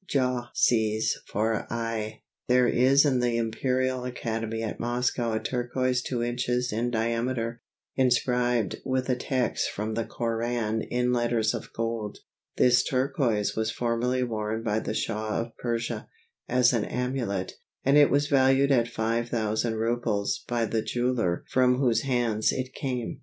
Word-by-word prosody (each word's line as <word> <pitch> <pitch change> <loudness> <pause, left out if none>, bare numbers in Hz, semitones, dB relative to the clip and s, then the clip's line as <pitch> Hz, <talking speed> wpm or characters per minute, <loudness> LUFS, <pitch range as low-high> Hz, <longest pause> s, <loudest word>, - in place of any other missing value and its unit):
Jah 125 -3 0
sees 110 -2 +2
for 110 +1 -1
aye. 115 -2 -3 0.2
There 125 0 +4
is 135 +5 +4
in 130 -3 +2
the 120 -1 +1
Imperial 130 +3 0
Academy 115 -2 -3
at 110 - -4
Moscow 120 -1 0
a 110 - 0
turquoise 125 +2 -1
two 125 -2 -2
inches 125 0 -1
in 115 +3 0
diameter, 115 +1 -1 0.3
inscribed 125 -3 +1
with 130 0 -1
a 125 - +3
text 125 0 -1
from 110 +2 -3
the 115 +1 -1
Koran 115 -1 -2
in 125 +2 0
letters 120 -2 +1
of - - -6
gold. 115 -2 -3 0.4
This 125 -1 +5
turquoise 130 -5 0
was 110 0 0
formerly 120 +2 0
worn 110 -1 -2
by 110 -1 0
the 110 - -4
Shah 110 -1 -1
of 115 0 -5
Persia 115 -1 -3 0.4
as 125 0 +4
an 115 -3 +1
amulet, 125 -7 -2 0.3
and 135 +2 +4
it 145 -1 +7
was 145 +1 +2
valued 135 0 +4
at 120 -3 +3
5000 115 0 -1
rubles 110 -2 -1
by 120 -1 0
the 110 0 -1
jeweller 120 -8 0
from 125 -1 +3
whose 125 -4 +2
hands 120 -5 +1
it 130 0 -4
came. 125 -4 -3
120 Hz, 145 wpm, -27 LUFS, 115-125 Hz, 0.4 s, it